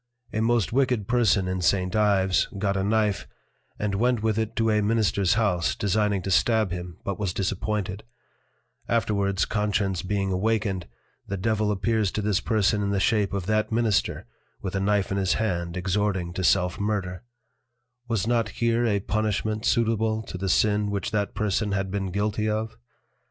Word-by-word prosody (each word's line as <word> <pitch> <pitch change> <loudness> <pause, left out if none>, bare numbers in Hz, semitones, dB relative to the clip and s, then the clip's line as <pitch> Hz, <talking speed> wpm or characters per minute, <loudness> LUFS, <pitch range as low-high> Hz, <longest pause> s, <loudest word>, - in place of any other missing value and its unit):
A 110 - -1
most 115 -2 +1
wicked 125 -6 +1
Person 110 -6 +2
in 95 0 -2
St. 90 +2 +1
Ives, 95 -4 +3
got 100 0 0
a 95 - 0
Knife, 105 -1 +1 0.5
and 105 -1 -2
went 120 +2 +1
with 110 -1 +1
it 110 0 -2
to 115 0 +2
a 105 0 +2
Ministers 105 -2 +2
House, 90 - +1
designing 105 +3 0
to 95 - -3
stab 110 0 +3
him, 90 -1 -6
but 100 0 -3
was 100 -3 -2
disappointed; 100 0 -2 0.9
afterwards 100 -4 +1
Conscience 100 -3 0
being 95 0 -1
awakened, 100 -2 0 0.4
the 100 - -3
Devil 105 +1 0
appears 105 0 0
to 105 - -1
this 105 -1 +2
Person 105 -1 +1
in 100 - -1
the 100 -1 +1
Shape 105 -1 +2
of 100 -3 -3
that 110 +2 0
Minister, 110 -3 +1 0.3
with 95 - -5
a - - +1
Knife 100 0 +1
in 100 - 0
his 95 -1 +2
hand 85 -5 -2
exhorting 95 -1 -1
to 95 - -3
Self 90 0 +2
murder: 100 -3 -2 0.9
Was 115 -4 0
not 115 -2 +1
here 115 +1 +1
a 100 -2 +1
Punishment 110 +1 -1
suitable 110 -1 +1
to 95 - -8
the 95 0 -2
Sin 105 +1 +2
which 100 -1 -2
that 105 -2 -1
Person 105 -1 0
had 95 -1 -1
been 100 -1 -2
guilty 105 +3 -1
of? 110 +1 -2
105 Hz, 175 wpm, -25 LUFS, 95-110 Hz, 0.9 s, Ives